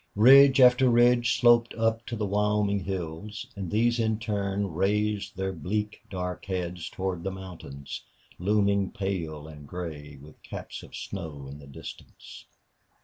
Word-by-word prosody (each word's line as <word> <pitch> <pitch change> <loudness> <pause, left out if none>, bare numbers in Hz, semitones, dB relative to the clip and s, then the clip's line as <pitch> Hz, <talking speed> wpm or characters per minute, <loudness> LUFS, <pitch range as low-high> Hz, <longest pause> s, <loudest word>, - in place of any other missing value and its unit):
Ridge 135 +5 +8
after 125 0 +6
ridge 120 0 +4
sloped 120 -1 +5
up 115 0 0
to 120 - -3
the 105 -2 -2
Wyoming 105 0 +1
hills, 95 +3 -5
and 95 -3 -5
these 120 +4 +2
in 110 -1 +1
turn 100 -3 -2
raised 105 +2 0
their 95 0 -2
bleak, 105 +6 -3
dark 90 -2 -4
heads 90 -2 -4
toward 95 -2 -3
the 95 - -1
mountains, 90 -8 -8 0.4
looming 100 0 +2
pale 80 -6 -4
and 75 -2 -11
gray, 75 -4 -7
with 75 +2 -15
caps - - -8
of - - -12
snow, 80 -8 -6
in 70 +2 -9
the 70 - -13
distance. 70 - -11
100 Hz, 145 wpm, -27 LUFS, 85-110 Hz, 0.4 s, Ridge